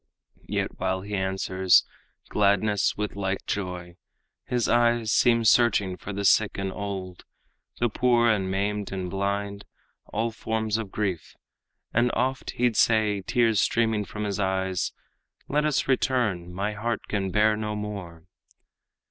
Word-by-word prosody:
Yet - - -3
while 95 0 -1
he 105 +2 -8
answers 95 -1 +2 0.4
gladness 100 0 +2
with 105 -1 -3
like 95 -1 -2
joy, 90 -3 -4 0.5
His 125 -2 0
eyes 120 -2 +2
seem 115 -1 +4
searching 105 -4 +4
for 100 - -8
the 100 0 -3
sick 110 +2 +3
and 95 -1 -3
old, 95 -3 -6 0.6
The 120 - +3
poor, 120 +1 +2
and 100 -5 +1
maimed, 100 +1 -2
and 95 -2 -4
blind 100 +1 -2 0.4
all 115 +2 -2
forms 110 -1 -2
of 105 -4 -6
grief, 95 -6 -3 0.6
And 120 +2 +3
oft 130 +1 -1
he'd 120 -2 +2
say, 110 -3 +3
tears 115 +1 +2
streaming 110 -2 +1
from 105 +1 -6
his 100 -1 -2
eyes, 95 -2 -1 0.6
'Let 150 +1 +1
us 150 -3 +1
return; 120 -10 0
my 100 +4 -2
heart 115 +1 -3
can 100 -2 -1
bear 105 +3 +3
no 105 0 -3
more.' 100 -6 -6
105 Hz, 140 wpm, -26 LUFS, 95-115 Hz, 0.6 s, seem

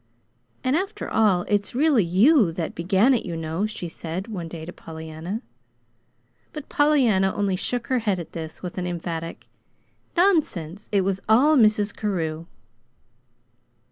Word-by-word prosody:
"And 255 +2 +2
after 395 +5 -2
all 200 -5 +3
it's 205 +1 0
really 280 -5 +4
YOU 200 - +4
that 165 -1 -4
began 190 +9 +3
it, 240 - 0
you 170 -2 -5
know," 165 +5 -2
she 215 -5 -6
said 170 +4 -5
one 185 -7 -5
day 160 -1 -8
to 175 - -8
Pollyanna. 160 +7 -7 1.1
But 300 -2 -8
Pollyanna 245 -11 +3
only 200 -2 0
shook 235 +5 -2
her 255 +1 +1
head 205 -5 0
at 170 - -8
this 160 +1 -8
with 180 +1 -5
an 180 - -2
emphatic: 165 -1 -5 0.7
"Nonsense! 215 - +1
It 200 -2 +3
was 195 0 -1
all 275 +8 +5
Mrs. 215 -4 +3
Carew." 165 -6 -3
195 Hz, 145 wpm, -24 LUFS, 170-235 Hz, 1.1 s, all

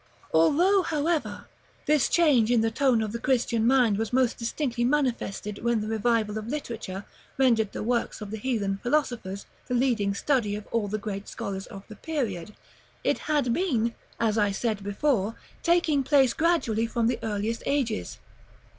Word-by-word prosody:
§ - - -34
XLVIII. - - -30
Although, 345 - +4
however, 320 -1 -1 0.4
this 300 -3 +3
change 285 -10 +4
in 240 -2 +4
the 225 0 +1
tone 245 -2 +2
of 215 - -3
the 235 - -4
Christian 235 -3 +1
mind 245 -6 +4
was 225 -1 -2
most 250 -1 +2
distinctly 240 0 -2
manifested 240 -6 -1
when 235 -1 +2
the 210 - -4
revival 220 -1 0
of 215 - -8
literature 230 -8 -5 0.3
rendered 230 -6 +3
the - - -5
works 235 +1 -1
of 210 -2 -7
the 220 - -4
heathen 205 -5 -1
philosophers 245 -8 -1 0.2
the 250 - -1
leading 230 -6 +1
study 230 -4 0
of 210 0 -7
all 225 -3 0
the 210 +2 -2
greatest 200 -1 -6
scholars 195 -1 -5
of 195 -1 -10
the 215 - -10
period, 210 - -4 0.5
it - - +1
had 285 -6 +2
been, 235 -10 0 0.3
as 225 -1 +1
I 205 -1 +2
said 210 +1 -2
before, 205 +1 0 0.3
taking 335 -4 +3
place 265 -2 +4
gradually 305 -10 +1
from 230 0 -1
the 240 +1 +1
earliest 220 +1 -2
ages. 265 - -1
230 Hz, 170 wpm, -26 LUFS, 210-270 Hz, 0.5 s, Although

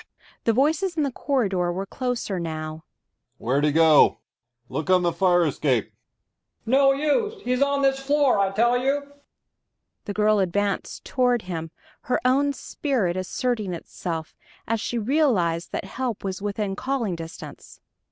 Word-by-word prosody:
"Quiet!" - - -28
The 230 - +3
voices 320 - +1
in 305 - +2
the 280 - -1
corridor 195 -11 0
were 190 +3 -3
closer 240 -4 -3
now. 155 -1 -5 0.5
"Where'd 135 +5 0
he 150 - +3
go? 160 0 +5 0.5
Look 155 +5 -4
on 185 -1 +4
the 170 - +2
fire 175 -2 +3
escape." 135 -6 0 0.7
"No 275 +3 +5
use 410 - 0
he's 250 +1 0
on 280 0 +2
this 270 0 +3
floor, 280 -4 +2
I 195 -1 +3
tell 235 +5 +2
you." 280 +2 -1 0.9
The 205 - -4
girl 210 0 +3
advanced 200 +1 -1
toward 245 -3 +1
him, 165 -3 -5 0.4
her 250 - +2
own 275 +3 +3
spirit 250 - -1
asserting 205 +1 -2
itself, 165 -1 -6 0.3
as 225 -1 0
she 240 - -2
realized 215 - +1
that - - -3
help 250 -5 -4
was 190 -1 -4
within 205 -1 -2
calling 250 -5 -2
distance. 165 -1 -10
215 Hz, 150 wpm, -24 LUFS, 175-270 Hz, 0.9 s, go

